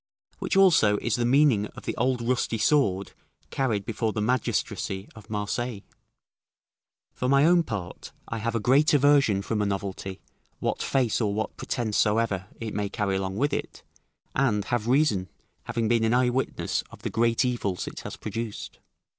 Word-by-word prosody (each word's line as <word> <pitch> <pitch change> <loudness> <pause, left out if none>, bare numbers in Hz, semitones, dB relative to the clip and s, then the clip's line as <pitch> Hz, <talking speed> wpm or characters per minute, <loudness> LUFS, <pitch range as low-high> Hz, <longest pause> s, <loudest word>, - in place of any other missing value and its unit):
Which - - -1
also 155 - +5
is 115 -1 -1
the 120 -1 0
meaning 130 -6 +4
of - - -10
the - - -2
old 125 0 0
rusty 125 -2 0
sword 105 -7 +2 0.4
carried 110 -7 0
before 110 -1 -2
the 110 - -2
magistracy 105 -4 -1
of 110 0 -14
Marseilles. 105 +1 -3 1.3
For 125 - -2
my 140 +2 +5
own 175 +1 +5
part, 105 - -6 0.2
I 115 - -4
have 115 +1 -2
a - - +1
great 135 +7 +4
aversion 140 -8 +4
from 105 +1 -1
a - - +1
novelty, 95 -1 -4 0.4
what - - -2
face 125 -4 +1
or 100 -2 0
what 110 +1 -3
pretence 115 -5 -2
soever 105 -3 +1
it 110 -2 -5
may 105 -1 -2
carry 100 -2 -1
along 95 0 -3
with 145 +5 +1
it, - - -4 0.5
and 115 -7 +1
have 120 -2 -1
reason, 120 - +2 0.4
having 115 -1 -1
been 115 0 +2
an 115 +2 +3
eyewitness 125 +1 0
of - - -15
the - - -3
great 115 +2 +2
evils 110 -7 -2
it - - -7
has - - -7
produced. 110 0 -6
115 Hz, 170 wpm, -26 LUFS, 105-125 Hz, 1.3 s, also